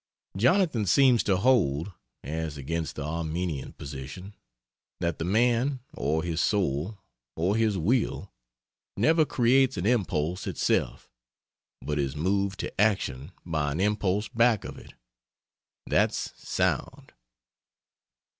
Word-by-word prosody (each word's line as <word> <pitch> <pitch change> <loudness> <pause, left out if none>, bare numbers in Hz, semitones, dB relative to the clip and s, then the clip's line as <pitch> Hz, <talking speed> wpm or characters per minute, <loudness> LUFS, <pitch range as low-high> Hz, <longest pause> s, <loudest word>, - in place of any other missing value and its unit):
Jonathan 130 - +3
seems 125 +4 +5
to 95 -3 +1
hold 95 - +2 0.3
(as 80 +1 -4
against 80 +2 -3
the 75 - -4
Arminian 80 -1 -3
position) 70 +8 -8 0.7
that 85 -2 -2
the - - -1
Man 120 +7 +2
(or 80 +3 -1
his 85 -1 -1
Soul 95 0 0 0.4
or 90 +6 +1
his 110 -3 +1
Will) 110 +9 0 0.6
never 160 -1 +4
creates 130 -1 +3
an 85 - -2
impulse 90 -7 0
itself, - - -1 0.8
but 75 0 -2
is 70 -1 -1
moved 95 +4 0
to - - -3
action 85 -11 0
by 75 -4 -1
an 80 - -3
impulse 105 0 +1
back 115 -2 +2
of - - -7
it. - - -15 0.9
That's - - 0
sound! - - -2
95 Hz, 115 wpm, -27 LUFS, 80-115 Hz, 0.9 s, seems